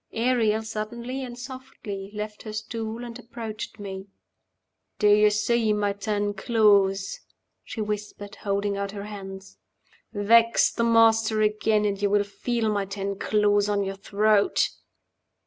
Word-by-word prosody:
Ariel 225 -2 +1
suddenly 235 +5 -5
and 245 -1 -7
softly 245 -6 -8
left 210 0 -5
her 215 - -7
stool, 225 +1 -5
and 240 0 -8
approached 225 -3 -7
me. 195 -1 -7 0.9
"Do 210 - +3
you 210 +1 +6
see 215 +1 +1
my 205 -1 0
ten 205 0 -1
claws?" 200 -3 +2 0.4
she 225 - -6
whispered, 210 -1 -5
holding 200 0 -1
out 200 0 -3
her 200 -1 -6
hands. 195 -2 -9 0.5
"Vex 230 +3 +4
the 235 - -1
Master 225 -1 +4
again, 215 0 +2
and 200 -1 -1
you 205 - +2
will 205 0 +3
feel 225 +3 -2
my 205 -2 0
ten 195 0 -4
claws 205 -1 +2
on 205 -1 +1
your 195 0 -3
throat!" 205 +1 +2
210 Hz, 140 wpm, -25 LUFS, 200-225 Hz, 0.9 s, you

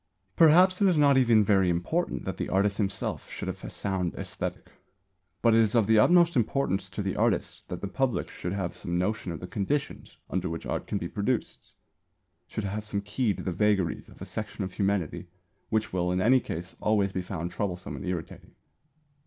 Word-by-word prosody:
Perhaps 180 +4 +6
it 200 - +6
is 180 -4 +3
not 145 -2 +5
even 120 -5 +5
very 95 -3 +3
important 90 - -1
that - - -4
the - - -3
artist 100 +1 +2
himself 100 -2 -2
should - - -6
have - - -5
a - - -5
sound 95 -3 -2
æsthetic; - - -5 0.8
but 115 - +5
it 115 - +5
is 110 0 +3
of 115 -3 +4
the 110 +1 +5
utmost 170 +5 +5
importance 105 -6 0
to 100 +1 -4
the 95 - -2
artist 110 -4 0
that - - -5
the 100 - -3
public 120 -1 -1
should 90 - -5
have 95 -3 -3
some 85 0 -3
notion 95 0 -1
of 80 - -5
the - - -6
conditions 135 +10 -3
under 90 -1 -2
which 80 0 -5
art - - -3
can 105 - -1
be 85 - -3
produced 105 +6 -3 0.7
should 110 - -4
have 100 +2 -3
some 105 -1 -2
key 105 +3 0
to - - -7
the 95 - -2
vagaries 105 -3 +1
of - - -16
a - - -6
section 105 -1 -5
of 95 -1 -5
humanity 100 -5 -1 0.4
which 110 -3 0
will 90 -1 0
in 90 - 0
any 125 +7 +5
case 90 -5 -6
always 100 -3 +1
be 95 - -1
found 90 -2 -4
troublesome 90 -1 -3
and - - -7
irritating. 90 -4 -6
100 Hz, 200 wpm, -28 LUFS, 90-115 Hz, 0.8 s, Perhaps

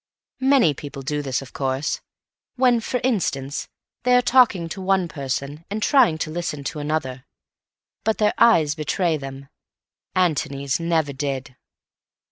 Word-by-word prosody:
Many 260 - +4
people 140 -1 -8
do 150 +1 -2
this, 135 -1 -2
of 130 - -14
course; 135 +2 -1 0.5
when, 250 -2 +4
for 250 +2 -2
instance, 150 - -1 0.3
they 250 0 +3
are 250 - +6
talking 235 -11 +4
to 190 - -6
one 190 -1 +2
person 140 +1 -4
and 210 +1 -3
trying 250 - +4
to 155 - -8
listen 160 -4 -4
to 150 - -4
another; 145 -4 -2 0.8
but 220 +1 +1
their 210 -1 +2
eyes 165 -11 +5
betray 160 +2 0
them. 135 -1 -8 0.7
Antony's 140 -6 0
never 165 -4 0
did. 135 -2 -4
155 Hz, 140 wpm, -23 LUFS, 140-200 Hz, 0.8 s, are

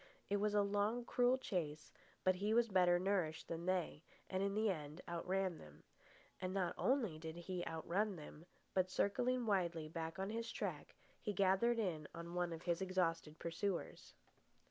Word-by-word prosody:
It 205 - +4
was 210 +1 +1
a 205 - +5
long, 205 +4 +1
cruel 245 +1 +4
chase, 160 - -3 0.3
but 185 - +5
he 210 +3 +1
was 235 -1 +4
better 180 -2 +5
nourished 180 -4 0
than 170 +1 -4
they, 180 -5 0 0.3
and 185 0 0
in 200 0 0
the 215 -1 +3
end 150 -3 -5
outran 180 +1 -1
them. 75 0 -14 0.6
And 185 0 -1
not 180 -3 +1
only 230 - +1
did 160 0 -6
he 175 +1 -4
outrun 185 +6 0
them, 155 +1 -10 0.3
but, 185 -1 +2
circling 245 +6 +1
widely 170 -6 +1
back 165 +1 -4
on 195 +2 -2
his 230 +1 -3
track, - - -4 0.3
he 210 - -1
gathered 195 +5 +3
in 170 -9 -1
one 170 +1 -2
of 165 -1 -6
his 170 0 0
exhausted 165 -4 0
pursuers. 170 +2 -3
185 Hz, 165 wpm, -40 LUFS, 165-205 Hz, 0.6 s, a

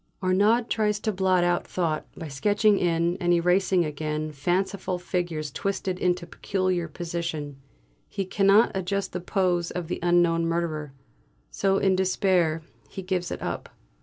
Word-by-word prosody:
Arnaud 205 +6 +4
tries 210 -2 0
to 220 - 0
blot 185 -2 +2
out 175 0 +1
thought 160 -4 -2
by 160 - -6
sketching 205 +8 +2
in 170 0 +1
and 175 0 +2
erasing 180 +1 +3
again 155 0 -3
fanciful 180 +5 -1
figures 175 -4 -3
twisted 190 +1 -2
into 180 -1 0
a - - -20
peculiar 185 -2 -1
position; 165 -3 -4 0.5
he 195 - -3
cannot 195 +3 +4
adjust 190 +1 -2
the 180 - -3
pose 180 -2 0
of 175 -2 -5
the - - -2
unknown 170 -1 +3
murderer. 160 -3 -2 0.6
So 195 0 +1
in 195 -1 +3
despair 185 -4 +1 0.3
he 190 - -7
gives 180 -1 -2
it - - -5
up. - - -4
180 Hz, 150 wpm, -26 LUFS, 165-190 Hz, 0.6 s, Arnaud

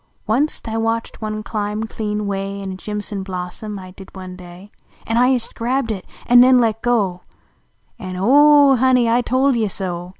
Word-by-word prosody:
Wunst 255 +8 -1
I 225 0 -3
watched 225 +1 -2
one 215 0 -4
climl) 210 0 -3
clean 210 -1 -4
way 195 0 -3
Tn 190 - -5
a - - -7
jim 210 +2 -5
son 205 -1 -4
blossom, 190 +3 -6
T 185 -1 -10
did, 190 +1 -14
one 185 -1 -8
day, 180 +2 -13 0.3
An 225 - -1
I 250 +1 +4
ist 255 -3 0
grabbed 245 +1 -1
it 195 -4 -6 0.2
an 245 0 +7
ncn 255 0 +6
let 225 -2 0
go 205 -7 0 0.8
An 185 -4 -6
"Ooh 285 +8 +5
ooh! - - +5
Honey! 250 -1 +3
I 235 +2 +3
told 260 +3 +1
yc 225 -3 0
so!" 180 -2 -5
215 Hz, 195 wpm, -19 LUFS, 195-245 Hz, 0.8 s, an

